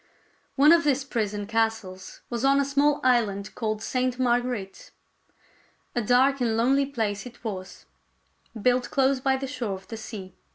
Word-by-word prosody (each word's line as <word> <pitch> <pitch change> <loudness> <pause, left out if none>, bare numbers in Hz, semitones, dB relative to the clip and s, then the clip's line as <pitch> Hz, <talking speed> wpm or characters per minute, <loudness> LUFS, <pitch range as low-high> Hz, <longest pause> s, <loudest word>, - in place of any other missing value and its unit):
One 295 +3 +6
of 335 0 +5
these 280 -2 +1
prison 210 -6 -2
castles 220 -4 -2
was 235 0 -4
on 275 +1 +4
a 280 - +2
small 285 +1 +2
island 215 -6 +1
called 215 -1 -3
Sainte 250 +2 -1
Marguerite. 245 -5 -1 1.0
A 240 - 0
dark 255 +4 +3
and 225 -2 +1
lonely 270 +4 +2
place 220 -5 -3
it 240 0 -15
was, 190 -5 -6 0.7
built 250 +3 +1
close 270 0 +2
by 265 0 +1
the 270 - -4
shore 240 -7 -3
of 190 0 -13
the 225 - -6
sea. 200 -4 -8
245 Hz, 160 wpm, -26 LUFS, 215-270 Hz, 1.0 s, One